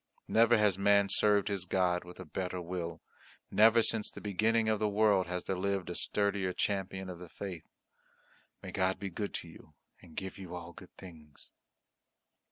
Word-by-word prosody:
Never 115 +1 +5
has 105 -3 +2
man 100 0 +4
served 105 -1 +3
his 100 -3 -2
God 90 -1 +1
with 90 +1 -12
a 95 - -7
better 90 +3 -4
will, 85 -1 -5 0.5
never 115 +2 +6
since 110 -1 +1
the - - -10
beginning 110 +3 +1
of 110 -1 +1
the 105 - +1
world 105 -3 +3
has 90 0 -3
there 95 - -2
lived 95 -1 -1
a - - -5
sturdier 100 -2 0
champion 95 -1 -2
of 90 -2 -7
the 90 -1 -10
faith. 90 -4 -7 1.0
May - - -6
God 95 0 +1
be 100 0 -5
good 100 +4 -4
to - - -4
you 80 -2 -15 0.3
and 80 - -16
give 95 +1 -5
you 90 -2 -7
all 85 0 -8
good - - -15
things!" 80 -5 -12
95 Hz, 180 wpm, -32 LUFS, 90-105 Hz, 1.0 s, never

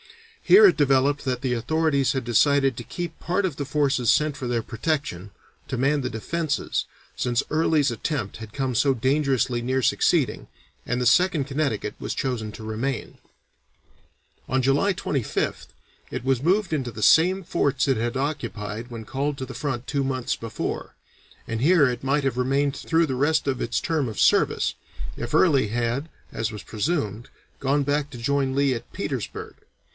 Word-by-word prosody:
Here 415 +3 +8
it 390 - +6
developed 140 0 +3
that 125 -2 -2
the 130 -2 0
authorities 140 +2 +1
had 130 -3 -2
decided 135 +2 +3
to 120 - -6
keep 170 +5 -6
part 185 +3 0
of 175 -7 -2
the 145 - -3
forces 135 -4 +2
sent 150 -1 +2
for 135 -3 -5
their 120 -2 -1
protection, 115 - -3 0.4
to 130 - -2
man 140 +3 +2
the 125 - -2
defences, 150 +7 -2 0.3
since 120 0 0
Early's 155 -2 +2
attempt 115 -2 -3
had 110 -2 -9
come 130 -1 -2
so 135 +4 +3
dangerously 130 -1 +1
near 130 +2 0
succeeding, - - +1 0.4
and 125 +1 -1
the 125 - 0
Second 165 +2 +3
Connecticut 140 -6 -2
was - - -4
chosen 115 -5 -2
to 110 - -9
remain. 115 +4 -3 1.3
On 130 +1 +2
July 140 +10 +3
25th 140 - -2 0.4
it 120 - -5
was 135 -1 +1
moved 185 +1 +2
into 130 -5 -1
the 110 -1 -5
same 185 - +5
forts 140 -6 0
it 135 - +3
had 120 +3 -1
occupied 120 -5 -4
when 115 -2 -7
called 140 +4 -2
to 130 - -4
the - - -9
front 130 -2 -3
two 140 -2 0
months 130 -2 -1
before, 115 -1 -5 0.5
and 115 0 -3
here 155 0 +5
it 125 0 -3
might 140 +1 +1
have 130 -2 0
remained 135 +2 +1
through 165 +1 +1
the 135 -4 -3
rest 145 +3 +1
of 130 -2 -1
its 115 - 0
term 155 -7 -1
of 110 - -6
service, - - +3 0.4
if - - -6
Early 145 -10 +4
had, 120 +7 -2 0.2
as 110 0 -2
was 105 -3 -8
presumed, 115 - -2 0.3
gone 140 +1 +1
back 145 +1 0
to 130 - -9
join 135 +2 0
Lee 140 -1 +3
at 115 - -7
Petersburg. - - -5
135 Hz, 175 wpm, -24 LUFS, 120-145 Hz, 1.3 s, Here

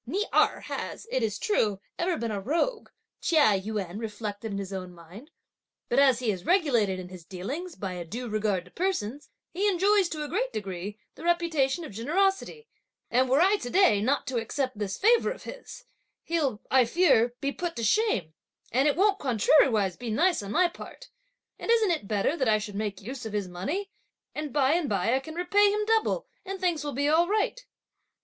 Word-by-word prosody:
"Ni 395 - -1
Erh - - +3
has, - - -6
it 260 - 0
is 210 -3 -1
true, 210 - 0 0.2
ever 345 -1 0
been 230 -1 -3
a 200 -2 -3
rogue," 340 - -1 0.3
Chia 290 - +4
Yün 200 -2 -4
reflected 215 -1 -5
in 200 - -3
his 195 -1 -5
own 185 -2 -6
mind, 180 - -13 0.6
"but 245 - +3
as 270 -4 +5
he 240 -3 0
is 185 -3 -6
regulated 245 - +2
in 180 -1 -8
his 180 -2 -11
dealings 270 - -6
by 190 -2 -5
a 175 -1 -5
due 235 +9 -6
regard 210 -4 -1
to 180 - -18
persons, 295 - -2 0.2
he 390 +4 0
enjoys, 395 0 +3
to 305 -1 -4
a - - -4
great 475 +11 -1
degree, 195 +1 -5 0.2
the - - -12
reputation 335 -3 +1
of - - -9
generosity; 385 - -1 0.4
and 255 +2 +3
were 270 +4 +4
I 390 +3 +4
to 245 - -6
day 355 - +4
not 270 +6 +1
to 255 -1 -2
accept 255 +1 -2
this 200 -2 -3
favour 460 +4 +4
of - - -6
his, - - -10 0.4
he'll, 290 -10 -1
I 260 -2 +5
fear, 240 -5 +3
be 280 - -1
put 345 +2 -4
to 230 - -4
shame; 220 - +1 0.4
and 265 +5 +3
it 290 - +2
won't 395 +3 +3
contrariwise 225 - +3
be 240 -1 -5
nice 335 +9 +2
on 200 0 -6
my 355 +8 +4
part! - - -11 0.5
and - - -7
isn't 450 -5 +4
it 305 -12 -2
better 210 +8 +1
that 260 -6 +1
I 215 - +4
should 210 -1 -6
make 205 -1 -3
use 250 +1 -6
of 215 - -8
his 205 -3 -1
money, 295 - -4 0.4
and 300 -1 -4
by 275 -1 +3
and 335 -5 0
by 200 +3 +1
I 260 - +3
can 315 +4 -9
repay 400 +4 +3
him 420 +1 0
double, 445 +3 +1 0.2
and 390 0 -6
things 345 -5 0
will 290 -1 -4
be 285 +3 0
all 325 +3 +4
right!" 430 +5 0
265 Hz, 205 wpm, -27 LUFS, -, 0.6 s, as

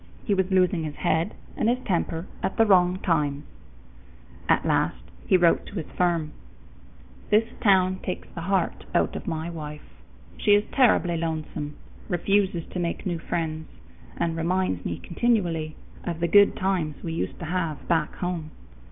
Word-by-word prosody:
He 210 - +2
was 190 -1 +1
losing 185 -2 +3
his 150 -2 -4
head 165 +6 0 0.2
and 225 - +1
his 245 - +2
temper 170 -3 -1 0.2
at - - -2
the 225 - +6
wrong 180 -3 +4
times. 150 -4 +1 1.1
At - - +3
last - - +1 0.2
he 185 - +6
wrote 175 -2 +3
to - - -10
his 165 -5 -5
firm: 170 -4 +1 1.0
"This 215 +2 +4 0.2
town 185 -3 +4
takes 185 - -4
the 170 - -6
heart 185 0 0
out - - +2
of - - -6
my 160 +1 -3
wife. 150 -2 -7 0.6
She 205 - +5
is 205 - +3
terribly 210 -10 +3
lonesome, 155 -2 -3 0.3
refuses 185 -1 +1
to 180 - -3
make 170 +3 -2
new 175 -3 -1
friends, 160 -1 -3 0.5
and 165 -1 0
reminds 165 - 0
me 85 - -3
continually 170 -7 0 0.3
of 170 -2 -3
the 170 - +1
good 200 +3 +6
times 185 -6 0
we 165 - -3
used 165 - -3
to 175 - -6
have 165 -3 -2
back 160 -3 +1
home. 175 -3 -3
170 Hz, 160 wpm, -26 LUFS, 160-190 Hz, 1.1 s, the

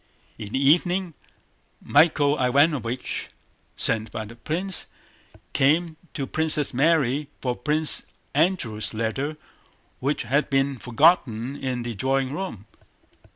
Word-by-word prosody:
In 105 -1 -8
the 130 - +1
evening 175 +2 +2 0.7
Michael 145 -1 +3
Ivánovich, 130 -2 0 0.5
sent 110 -1 +1
by 110 - -5
the 115 +2 -12
prince, 170 +9 -1 0.7
came 160 +4 +2 0.2
to 140 - -2
Princess 155 0 +2
Mary 145 0 +2
for 125 -2 -2
Prince 155 +3 +3 0.3
Andrew's 140 - 0
letter 135 +7 -2 0.6
which 140 +3 -1
had 140 +6 0
been 135 -1 0
forgotten 125 -2 +2
in 130 -3 -3
the 120 0 -4
drawing 130 +4 -1
room. 150 - -6
140 Hz, 110 wpm, -24 LUFS, 120-155 Hz, 0.7 s, Michael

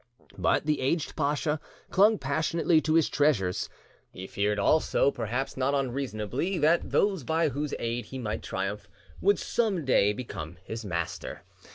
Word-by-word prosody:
But - - +2
the 150 -2 +1
aged 145 +4 0
pacha 150 +1 0 0.3
clung 210 +3 +5
passionately 160 +3 +1
to 155 0 +1
his 165 -2 +4
treasures. 120 -12 +1 0.4
He 95 - -8
feared 105 +2 0
also, 140 +5 +3
perhaps 125 +3 -3
not 135 +2 +1
unreasonably, 135 - -2
that 165 +2 +3
those 195 -7 +2
by 160 +4 +1
whose 145 +1 -3
aid 120 +1 -2
he 135 - -7
might 110 -4 -3
triumph 100 +1 -4 0.3
would 200 +1 +4
some 200 -9 0
day 105 -6 +4
become 90 -8 -6
his 110 +3 -6
master. 85 -4 -4
135 Hz, 150 wpm, -28 LUFS, 105-160 Hz, 0.4 s, clung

